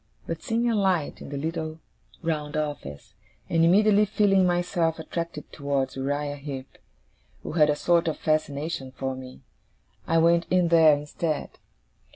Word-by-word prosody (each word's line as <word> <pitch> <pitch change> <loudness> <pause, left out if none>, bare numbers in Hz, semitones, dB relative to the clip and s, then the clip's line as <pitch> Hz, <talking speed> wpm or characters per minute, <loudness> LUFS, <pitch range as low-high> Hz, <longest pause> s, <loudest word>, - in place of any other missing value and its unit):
But, 165 -1 -5
seeing 230 +1 0
a 235 - +2
light 190 -7 0
in - - -8
the 140 - -4
little 160 +1 -4 0.4
round 155 -2 -2
office, 145 - -5 0.3
and 165 -1 +2
immediately 205 +4 +5
feeling 195 -2 +3
myself 175 -2 0
attracted 165 -1 -6
towards 140 -2 -2
Uriah 145 +2 -2
Heep, 135 -2 -8 0.6
who - - -5
had 155 -2 +4
a 150 - +3
sort 170 +2 +2
of 160 - -1
fascination 150 -2 -1
for 130 0 -3
me, 130 0 -10 0.7
I 165 - +2
went 170 +1 +4
in 180 -2 +3
there 160 -3 +6
instead. 150 +1 -3
160 Hz, 150 wpm, -26 LUFS, 145-170 Hz, 0.7 s, there